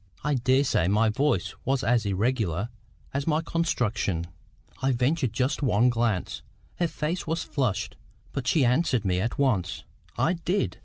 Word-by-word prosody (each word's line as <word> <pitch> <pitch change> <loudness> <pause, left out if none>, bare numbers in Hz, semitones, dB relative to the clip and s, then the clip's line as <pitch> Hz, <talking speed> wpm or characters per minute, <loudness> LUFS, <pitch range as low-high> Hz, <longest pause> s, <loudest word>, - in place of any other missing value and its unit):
I 150 - +1
daresay 130 -7 +2
my 110 +3 +3
voice 105 -5 0
was 135 0 0
as 115 -2 +2
irregular 100 -1 0 0.4
as 140 +2 -2
my 155 -1 +3
construction. 115 - 0 0.6
I 135 0 +2
ventured 130 +1 +1
just 130 +6 0
one 125 -2 +3
glance. 115 -5 -1 0.4
Her 175 - +1
face 160 +2 -3
was 160 +1 -1
flushed. 125 -10 -1 0.4
But 130 -2 -4
she 130 +2 +4
answered 125 -3 +2
me 90 -1 +1
at 115 +5 -2
once. 120 -11 0 0.3
"I 170 - +2
did." 180 +3 -1
125 Hz, 150 wpm, -27 LUFS, 105-145 Hz, 0.6 s, she